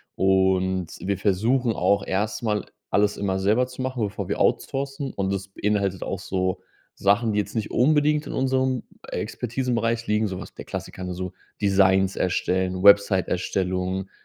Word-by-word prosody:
Und, 95 -1 +2
wir 100 0 -1
versuchen 110 +5 +1
auch 100 +3 +2
erstmal 105 +2 -1 0.2
alles 105 0 +2
immer 95 -2 -1
selber 110 +6 +2
zu 130 0 -8
machen, 130 -3 -2
bevor 100 - -5
wir - - -2
outsourcen 135 0 -1
und 95 -1 -1
das 100 0 -3
beinhaltet 100 -1 -1
auch 95 - -3
so 95 -1 -2 0.4
Sachen, 105 +3 +3
die - - -1
jetzt 100 0 -3
nicht 110 - -1
unbedingt 150 +3 +3
in - - -6
unserem 130 -1 +1 0.3
Expertisenbereich 115 -2 -2
liegen, 105 0 +2
so 95 -1 -5
was 85 - -10
der - - -9
Klassiker, 95 - -6
ne, 90 0 -4
so 90 0 -5 0.3
Designs 95 -1 +3
erstellen, 95 0 0
Website-Erstellung, 95 -1 +2
100 Hz, 150 wpm, -24 LUFS, 95-115 Hz, 0.4 s, Sachen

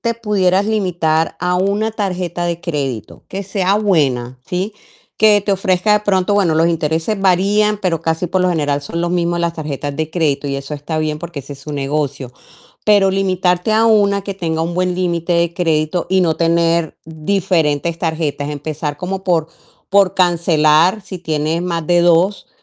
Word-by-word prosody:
te 235 -1 -1
pudieras 200 -3 +1
limitar 175 -7 0
a 180 0 +1
1 200 +4 0
tarjeta 180 -5 -3
de 170 0 -3
crédito 135 -8 -4
que 195 +1 -5
sea 195 0 0
buena, 135 - 0
¿sí? 190 +4 -3 0.4
Que 210 -1 +5
te 200 0 -1
ofrezca, 190 +2 +1
de 210 - +3
pronto, 200 -1 +1
bueno, 175 -6 +2
los 165 +1 +3
intereses 165 +5 -1
varían, 200 +3 +2
pero 170 -5 0
casi, 165 +2 -1
por 185 +2 0
lo 185 - +2
general, 145 -4 0
son 165 +4 -4
los 175 +1 -1
mismos 175 -1 0
las 170 -1 0
tarjetas 145 -3 -5
de 155 +1 -3
crédito 145 -4 0
y 140 - -2
eso 140 +2 -6
está 155 +2 -4
bien, 155 0 -2
porque 170 -4 -7
es 140 +1 -8
su 145 +2 -9
negocio. 140 -2 -3 0.5
Pero 205 -2 +4
limitarte 185 0 +1
a 220 +1 +3
1 200 -3 +3
que 200 0 -5
tenga 165 -4 -2
un 170 +1 -3
buen 180 0 0
límite 175 -1 -1
de 170 0 +1
crédito 165 -1 0
y 190 0 +3
no 165 -3 +2
tener 165 0 +1
diferentes 165 -1 0
tarjetas, 160 -3 -2
empezar 150 0 -4
como 190 +3 -4
por 165 -4 +1 0.4
por 195 -2 +4
cancelar, 170 +1 +3
si 185 -1 -8
tienes 160 +1 -1
más 170 -3 -3
de 175 +1 +3
2, 175 +3 +2
170 Hz, 180 wpm, -17 LUFS, 155-190 Hz, 0.5 s, Que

